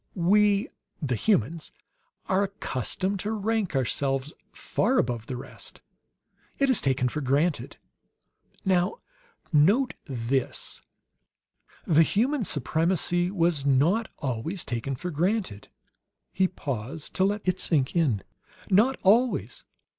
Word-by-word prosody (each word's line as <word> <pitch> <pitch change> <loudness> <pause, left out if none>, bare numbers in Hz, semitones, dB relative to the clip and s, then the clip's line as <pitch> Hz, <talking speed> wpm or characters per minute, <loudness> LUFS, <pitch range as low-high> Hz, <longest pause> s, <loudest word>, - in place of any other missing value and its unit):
We, 205 +4 +3 0.3
the 140 -6 -1
humans, 160 - 0 0.6
are 190 +1 +2
accustomed 195 - -2
to 210 +3 -2
rank 215 -4 -1
ourselves 135 +2 -1 0.2
far 250 +6 0
above 120 - 0
the 130 - -4
rest. 125 - -11 0.8
It 275 -1 +3
is 250 - +3
taken 130 -2 +1
for 150 +5 -3
granted. 145 +5 0 0.9
"Now, 185 - +2 0.6
note 200 - +4
this: 130 -1 -3 1.0
the 160 -1 +5
human 235 - +1
supremacy 175 +4 +1
was 170 -6 +1
not 150 - +2
always 140 - -3
taken 120 +3 -3
for 180 +8 -5
granted." 175 - -1 0.7
He 190 0 +3
paused 140 -4 -6
to 185 - +1
let 205 +2 0
it 185 0 0
sink 145 -4 0
in. 135 - +1 0.5
"Not 230 +8 +4
always. 235 +6 +2
170 Hz, 115 wpm, -26 LUFS, 135-200 Hz, 1.0 s, the